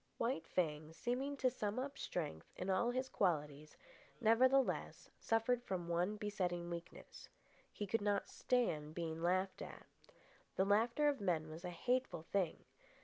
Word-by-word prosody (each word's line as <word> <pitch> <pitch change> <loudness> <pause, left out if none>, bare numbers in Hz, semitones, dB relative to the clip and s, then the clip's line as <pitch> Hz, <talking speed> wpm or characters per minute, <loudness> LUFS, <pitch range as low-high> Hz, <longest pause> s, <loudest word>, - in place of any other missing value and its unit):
White 230 -8 -1
Fang, 155 -3 -1
seeming 260 +9 -2
to 255 -2 +2
sum 210 -1 -2
up 275 +2 -2
strength 150 - -4
in 190 +1 -2
all 215 +6 +3
his 255 +2 -1
qualities, 150 - -1 0.4
nevertheless 255 +4 +3
suffered 230 +2 +2
from 185 -7 -3
one 175 +5 +1
besetting 180 -5 -2
weakness. 170 0 -8 0.4
He 205 - -4
could 215 +3 0
not 205 -1 +1
stand 160 -12 0
being 165 -1 -3
laughed 185 +2 +1
at. - - -8 0.7
The 190 - +3
laughter 230 +8 +3
of 285 -5 +1
men 160 -5 0
was 160 +3 -8
a 180 - -3
hateful 245 0 0
thing. 180 -1 -1
195 Hz, 145 wpm, -39 LUFS, 170-240 Hz, 0.7 s, all